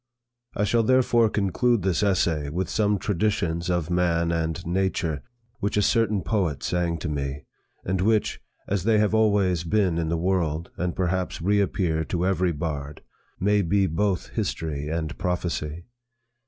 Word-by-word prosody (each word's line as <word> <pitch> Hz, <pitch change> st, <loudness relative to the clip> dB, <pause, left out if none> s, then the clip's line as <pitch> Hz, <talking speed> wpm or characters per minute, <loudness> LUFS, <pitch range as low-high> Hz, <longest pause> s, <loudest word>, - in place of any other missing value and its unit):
I 105 Hz, -, 0 dB
shall 115 Hz, +3 st, +3 dB
therefore 120 Hz, -1 st, +3 dB
conclude 105 Hz, +2 st, +1 dB
this 95 Hz, -1 st, +1 dB
essay 85 Hz, -7 st, +1 dB
with 90 Hz, +5 st, -2 dB
some 105 Hz, -1 st, +2 dB
traditions 85 Hz, -4 st, -1 dB
of 85 Hz, -2 st, -1 dB
man 85 Hz, -1 st, +1 dB
and 80 Hz, +1 st, -2 dB
nature, 85 Hz, -4 st, -1 dB, 0.4 s
which 105 Hz, +1 st, -1 dB
a 105 Hz, -, +3 dB
certain 110 Hz, -3 st, +2 dB
poet 90 Hz, -10 st, -1 dB
sang 85 Hz, -1 st, 0 dB
to -, -, -3 dB
me; 70 Hz, -1 st, -3 dB, 0.4 s
and 95 Hz, 0 st, 0 dB
which, 110 Hz, +2 st, +1 dB, 0.3 s
as 95 Hz, -3 st, -1 dB
they 110 Hz, +1 st, +3 dB
have 105 Hz, 0 st, +2 dB
always 100 Hz, -6 st, +2 dB
been 90 Hz, -1 st, +1 dB
in 80 Hz, -1 st, -1 dB
the 85 Hz, -, 0 dB
world, 85 Hz, -2 st, -1 dB
and 90 Hz, 0 st, -2 dB
perhaps 95 Hz, 0 st, -1 dB
reappear 95 Hz, -4 st, +1 dB
to 90 Hz, +1 st, -1 dB
every 95 Hz, -2 st, +1 dB
bard, 75 Hz, -2 st, -5 dB, 0.4 s
may 105 Hz, +2 st, +3 dB
be 100 Hz, +2 st, +2 dB
both 95 Hz, +2 st, -1 dB
history 75 Hz, -3 st, -3 dB
and 80 Hz, 0 st, -3 dB
prophecy. 85 Hz, -2 st, -2 dB
90 Hz, 155 wpm, -25 LUFS, 80-100 Hz, 0.4 s, shall